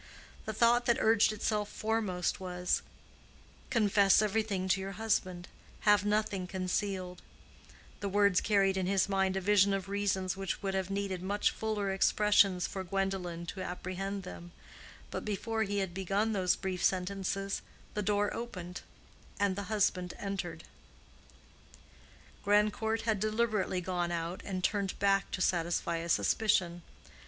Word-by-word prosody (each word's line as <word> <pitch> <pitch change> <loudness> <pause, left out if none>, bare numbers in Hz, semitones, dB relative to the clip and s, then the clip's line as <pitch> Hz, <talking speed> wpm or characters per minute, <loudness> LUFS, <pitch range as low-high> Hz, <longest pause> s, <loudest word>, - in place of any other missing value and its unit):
The 220 - -3
thought 240 +2 +3
that 235 - +4
urged 220 -1 +4
itself 210 -1 -1
foremost 215 -5 -1
was—"Confess 195 +3 0
everything 210 -3 0
to 190 +1 +2
your 195 +1 -5
husband; 185 -4 -1 0.3
have 205 -2 +4
nothing 205 -3 0
concealed:"—the 185 +1 -5
words 200 -1 +3
carried 195 -2 +2
in 185 -1 0
his 195 -1 +2
mind 190 -1 +1
a - - -1
vision 200 0 +4
of 195 -1 -4
reasons 195 -2 0
which 195 +1 -4
would 195 -1 -1
have 190 -1 -1
needed 195 -2 -2
much 200 +2 +1
fuller 210 -3 -2
expressions 195 -1 +3
for 190 - -4
Gwendolen 185 -2 -2
to 185 +3 -6
apprehend 190 +2 -4
them, 175 -1 -9 0.6
but - - -4
before 220 +2 -2
he 205 -1 -1
had 190 -3 -1
begun 195 +4 0
those 185 -3 +2
brief 190 -2 -4
sentences, 195 +1 -1 0.3
the 210 - -1
door 205 0 +1
opened 180 -7 -6 0.6
and 200 -2 +2
the 200 0 -5
husband 185 -4 0
entered. 175 -5 -4 1.8
Grandcourt 210 +2 +2
had 220 -3 +1
deliberately 215 -3 0
gone 175 -1 -2
out 170 +1 -3
and 185 -2 -3
turned 200 -2 0
back 195 -1 +2
to 185 - -4
satisfy 170 -1 0
a 170 +1 -5
suspicion. 175 -4 +2
195 Hz, 135 wpm, -31 LUFS, 185-210 Hz, 1.8 s, that